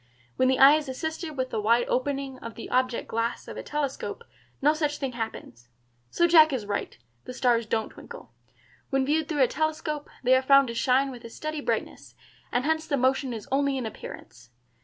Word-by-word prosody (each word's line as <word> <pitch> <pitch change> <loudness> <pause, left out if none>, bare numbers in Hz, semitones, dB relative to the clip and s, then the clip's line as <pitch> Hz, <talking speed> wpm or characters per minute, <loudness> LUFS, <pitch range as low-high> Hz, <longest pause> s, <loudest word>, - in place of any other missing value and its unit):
When 255 - +2
the 260 0 +3
eye 275 +3 +8
is 305 -3 -5
assisted 315 +3 -5
with 260 0 -2
the 220 - -1
wide 235 +3 +3
opening 270 0 -2
of 230 - -8
the 230 - -8
object 255 -1 0
glass 230 +1 -2
of - - -7
a - - -5
telescope 295 - -4 0.4
no 295 +2 +4
such 300 -1 -1
thing 270 -2 -3
happens. 220 - -7 0.4
So 345 - +2
Jack 320 -2 +7
is 250 -6 -2
right; 200 0 -3 0.3
the 250 - -7
stars 240 -3 +2
don't 220 0 -1
twinkle. - - -12 0.6
When 270 -1 +1
viewed 305 +2 0
through 295 -4 +2
a - - +4
telescope, 305 0 -2
they 255 +1 +4
are 260 - +3
found 275 -1 +5
to - - -4
shine 260 +3 +2
with 245 -2 -11
a 230 - -8
steady 310 +5 -5
brightness, - - -3 0.4
and 245 +2 0
hence 315 0 0
the 285 - 0
motion 260 +1 +1
is 225 -3 -7
only 275 0 +1
in 255 - -3
appearance. 125 - -10
265 Hz, 200 wpm, -26 LUFS, 240-295 Hz, 0.6 s, eye